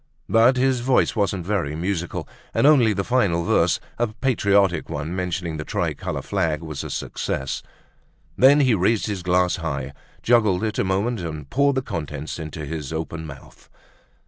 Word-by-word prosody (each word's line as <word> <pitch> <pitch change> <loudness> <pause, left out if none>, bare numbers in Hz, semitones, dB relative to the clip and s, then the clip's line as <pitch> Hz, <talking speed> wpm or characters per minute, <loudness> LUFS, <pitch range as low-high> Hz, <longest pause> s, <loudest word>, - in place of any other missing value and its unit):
But 115 +3 +4
his 130 0 +2
voice 125 0 +2
wasn't 100 -4 0
very 90 -7 -1
musical 90 +1 -3 0.3
and - - +3
only 135 -7 +6
the 100 -1 -1
final 100 -8 +1
verse, - - +2 0.2
a 120 - +2
patriotic 100 - +1
one 80 +2 -4
mentioning 90 -3 -3
the 75 - -4
tricolor - - -3
flag, 80 -1 -1
was 75 -3 -5
a - - -6
success. 65 0 -3 0.7
Then 140 +3 +6
he 130 -4 +4
raised 105 +3 +2
his 100 -4 -3
glass 90 0 +2
high, 70 -5 -4 0.3
juggled 110 -5 +3
it 110 -1 -2
a - - +3
moment, 100 +5 0
and 75 -5 -6
poured 140 - +2
the 130 - 0
contents 75 - -5
into 80 -1 -6
his 75 -1 -5
open 80 0 -4
mouth. 70 -3 -13
90 Hz, 165 wpm, -23 LUFS, 80-115 Hz, 0.7 s, only